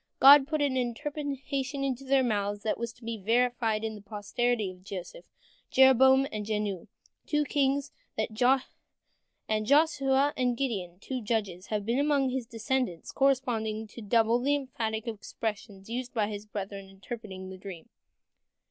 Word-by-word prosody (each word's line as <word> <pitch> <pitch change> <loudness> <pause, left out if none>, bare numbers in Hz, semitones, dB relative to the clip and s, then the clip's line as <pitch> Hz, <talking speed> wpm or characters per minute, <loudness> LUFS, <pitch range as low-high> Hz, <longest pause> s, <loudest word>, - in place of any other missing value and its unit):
" - - -52
God 275 0 +9
put 305 -1 0
an 275 -2 +1
interpretation 275 +1 -3
into 270 -1 -2
their 270 0 +3
mouths 205 -3 -1
that 220 - -1
was 235 -1 -3
to 245 - -21
be 230 0 -4
verified 230 0 +1
in 220 0 -2
the 210 - -10
posterity 210 +1 -1
of 185 0 -16
Joseph. 195 - -8 0.4
Jeroboam 265 0 +6
and 215 -1 -3
Jehu, 210 -4 -2 0.4
two 300 -1 +2
kings, 280 0 +1 0.3
and 215 0 -2 1.3
Joshua 280 +1 +3
and 250 -2 0
Gideon, 195 -10 -2
two 255 +4 -4
judges, 205 -5 -2
have 210 -2 -2
been 235 +4 +1
among 285 -2 +2
his 255 -2 -3
descendants, 230 -6 -2
corresponding 230 -5 +1
to 235 - -10
the 210 - -10
double 230 +2 +3
and - - -1
emphatic 240 -6 -1
expressions 210 -2 -5
used 245 +2 -5
by 215 -2 +2
his 210 0 -6
brethren 200 -1 -5
in - - -17
interpreting 195 -2 -8
the 190 - -8
dream. 185 -4 -9
235 Hz, 155 wpm, -29 LUFS, 210-265 Hz, 1.3 s, God